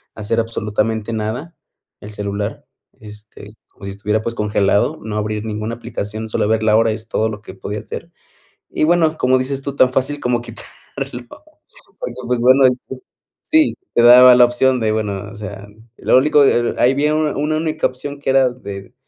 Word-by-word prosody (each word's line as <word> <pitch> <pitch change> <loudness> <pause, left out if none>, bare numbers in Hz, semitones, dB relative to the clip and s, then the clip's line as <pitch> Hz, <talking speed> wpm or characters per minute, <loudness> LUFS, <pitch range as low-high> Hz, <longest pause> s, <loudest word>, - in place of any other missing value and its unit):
hacer 110 +2 -2
absolutamente 110 0 -2
nada 110 +10 -4 0.4
el 105 - -10
celular, 100 +1 -5 0.4
este, 105 -1 -12 0.2
como - - -13
si 100 - -5
estuviera, 105 +2 -2
pues, 115 - -3
congelado, 105 -2 +1
no 105 -1 -4
abrir 105 0 -3
ninguna 110 +1 -4
aplicación. 110 -2 -6
Solo 105 - 0
ver 110 0 +1
la 110 -1 +3
hora 115 0 +3
es 110 +1 -6
todo 110 +1 0
lo 105 -1 -7
que - - -10
podía 100 +2 -6
hacer. - - -8 0.6
Y, - - -2
bueno, 160 -1 +2
como 130 +1 +3
dices 135 +1 -3
tú, 140 0 -5
tan 130 -2 +4
fácil 140 +2 -1
como 125 -2 -1
quitarlo, 120 - -11 1.3
porque, - - -6
pues 125 -1 0
bueno, 130 +3 +5
ahí 130 - +6 0.2
se - - -6 0.6
Sí 315 -1 +4 0.2
te 120 - +4
daba 125 +1 +9
la 125 0 +7
opción 125 +1 +1
de, 110 -2 0
bueno, 105 -2 -3
o - - -12
sea, 105 -1 -8 0.3
lo - - +2
único, 145 +1 +4
e - - +5
el 120 - -2
ahí 125 +2 +4
viene 150 +2 +1
una 155 -1 0
una 150 +2 0
única 155 0 0
opción 140 +3 -8
que 140 - -4
era 135 -1 +4
de 100 -3 -9
115 Hz, 190 wpm, -18 LUFS, 105-130 Hz, 1.3 s, daba